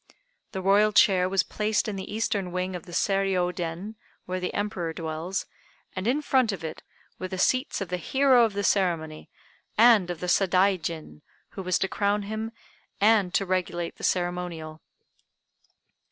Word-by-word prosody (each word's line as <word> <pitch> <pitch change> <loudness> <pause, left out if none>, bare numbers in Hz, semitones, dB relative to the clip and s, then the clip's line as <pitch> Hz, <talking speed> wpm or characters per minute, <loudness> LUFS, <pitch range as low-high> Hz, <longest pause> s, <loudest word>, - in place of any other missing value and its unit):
The 190 -2 -5
Royal 205 +2 +4
chair 185 -3 +5
was 195 0 +2
placed 215 +1 -1
in 210 - -3
the 190 - -6
Eastern 205 -4 -1
wing 185 +1 -2
of 175 - -8
the - - -10
Seiriô 190 -1 +1
Den, 175 +5 -5 0.3
where 185 0 -3
the 180 - -3
Emperor 190 -5 -3
dwells, 165 +3 -4 0.5
and 185 +2 -3
in 285 +5 +1
front 255 -6 +2
of 195 - -6
it 160 -1 -6 0.4
were 185 - -3
the 185 - -5
seats 255 +6 +1
of 195 - -4
the 180 - -1
hero 260 +6 +4
of 225 -3 +1
the 200 0 -2
ceremony 165 -6 0 0.5
and 220 -5 +6
of 175 -2 -4
the - - -4
Sadaijin, 180 -4 +1 0.3
who 195 - -7
was 185 -1 +1
to 190 - 0
crown 205 +2 0
him 220 +2 -4 0.5
and 205 -3 +4
to 195 - +2
regulate 180 -2 -2
the - - -12
ceremonial. 175 -3 -2
190 Hz, 170 wpm, -26 LUFS, 175-210 Hz, 0.5 s, and